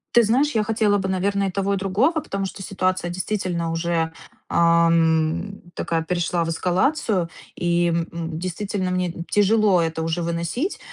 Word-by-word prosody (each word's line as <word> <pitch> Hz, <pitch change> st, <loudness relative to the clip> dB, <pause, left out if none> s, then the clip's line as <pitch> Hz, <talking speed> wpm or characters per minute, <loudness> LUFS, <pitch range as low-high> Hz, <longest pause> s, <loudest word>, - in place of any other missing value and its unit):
Ты 240 Hz, -, +8 dB
знаешь, 255 Hz, +7 st, +2 dB
я 220 Hz, -, +1 dB
хотела 210 Hz, -2 st, +2 dB
бы, 190 Hz, 0 st, -2 dB
наверно, 195 Hz, +1 st, 0 dB
и 190 Hz, -, -1 dB
того 195 Hz, +1 st, 0 dB
и -, -, 0 dB
другого, 210 Hz, -, +1 dB
потому 195 Hz, -6 st, -3 dB
что 195 Hz, -, -7 dB
ситуация 185 Hz, -2 st, -1 dB
действительно 180 Hz, -2 st, -2 dB
уже, 165 Hz, -1 st, -1 dB, 0.3 s
ам, 170 Hz, +2 st, +2 dB
такая 165 Hz, -1 st, -1 dB
перешла 175 Hz, 0 st, 0 dB
в -, -, -3 dB
эскалацию. 185 Hz, -, +1 dB, 0.3 s
И, 175 Hz, 0 st, +1 dB
м 170 Hz, 0 st, 0 dB
м, 165 Hz, -1 st, -5 dB
действительно 185 Hz, +1 st, -3 dB
мне 180 Hz, -1 st, 0 dB, 0.2 s
тяжело 205 Hz, -3 st, +4 dB
это 160 Hz, 0 st, -2 dB
уже 165 Hz, +2 st, -1 dB
выносить. 170 Hz, -, -2 dB
180 Hz, 160 wpm, -23 LUFS, 170-200 Hz, 0.3 s, Ты